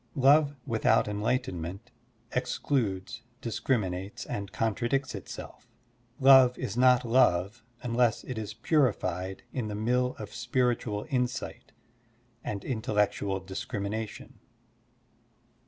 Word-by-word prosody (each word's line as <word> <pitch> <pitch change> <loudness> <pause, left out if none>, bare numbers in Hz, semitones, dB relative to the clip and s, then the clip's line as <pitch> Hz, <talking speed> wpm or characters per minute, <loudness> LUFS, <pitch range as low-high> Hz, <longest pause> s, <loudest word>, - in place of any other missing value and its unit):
Love 145 +1 +5
without 110 -2 +2
enlighten 105 -3 -1
ment 95 +9 -7 0.4
excludes, 110 -7 -1 0.2
discriminates, 110 -3 -2
and 100 -1 -5
contradicts 120 +4 0
itself. 100 -4 -9 0.5
Love 130 -2 +7
is 100 - -4
not 125 0 +5
love 110 -3 +3 0.2
tmless 120 -1 +1
it 130 - -4
is 110 -1 -5
purified 105 - 0
in 125 -5 -2
the 105 - -4
mill 125 +4 +1
of 105 -1 -8
spiritual 120 -3 0
insight 125 -2 -2 0.7
and 100 -2 -4
intellectual 105 -4 0
discrimination. 100 +3 -5
115 Hz, 100 wpm, -29 LUFS, 100-125 Hz, 0.7 s, Love